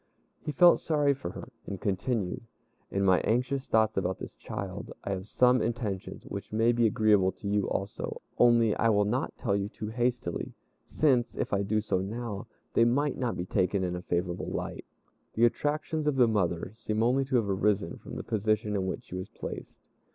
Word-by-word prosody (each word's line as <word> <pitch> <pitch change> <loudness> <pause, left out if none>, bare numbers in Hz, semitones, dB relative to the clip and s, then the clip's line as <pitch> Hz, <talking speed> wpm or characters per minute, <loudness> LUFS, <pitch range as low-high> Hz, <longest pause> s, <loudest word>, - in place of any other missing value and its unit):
He - - -4
felt 175 +3 +6
sorry 145 -3 +2
for 135 - -6
her, 120 - -8 0.2
and 100 -2 -5
continued, 105 +3 -1 0.5
"In 100 0 0
my 95 -1 +5
anxious 130 +4 0
thoughts 110 -1 +2
about 95 0 0
this - - -8
child, 100 0 -6
I - - -3
have 95 0 -4
some 125 +2 +4
intentions 110 -5 -3
which - - -7
may 115 +2 +3
be 120 -1 +3
agreeable 105 -3 +3
to 100 - -8
you 100 0 +1
also, 95 +1 -3 0.2
only 115 -3 +5
I 115 - +3
will 105 -1 +3
not 125 +6 -1
tell 100 -6 0
you 100 0 -1
too 105 0 -6
hastily, 120 -5 -2 0.3
since, 125 -6 +2
if - - -2
I 100 - +2
do 105 +2 +1
so 100 -3 0
now, 110 +2 -4 0.3
they 115 - +5
might 140 +5 +1
not 125 -3 -1
be 90 - -3
taken 95 0 +1
in 90 -1 -1
a 90 - -5
favorable 90 0 -2
light. - - -4 0.5
The 115 - +5
attractions 150 +4 0
of 150 - +2
the 125 -3 +5
mother 90 -5 0
seem 110 -1 -1
only 130 +3 +3
to 130 0 -1
have 115 -4 +3
arisen 100 -2 0
from - - -9
the - - -5
position 110 0 0
in 95 -1 0
which 95 - -4
she - - -13
was 95 +1 -5
placed. - - -8
110 Hz, 195 wpm, -29 LUFS, 95-120 Hz, 0.5 s, felt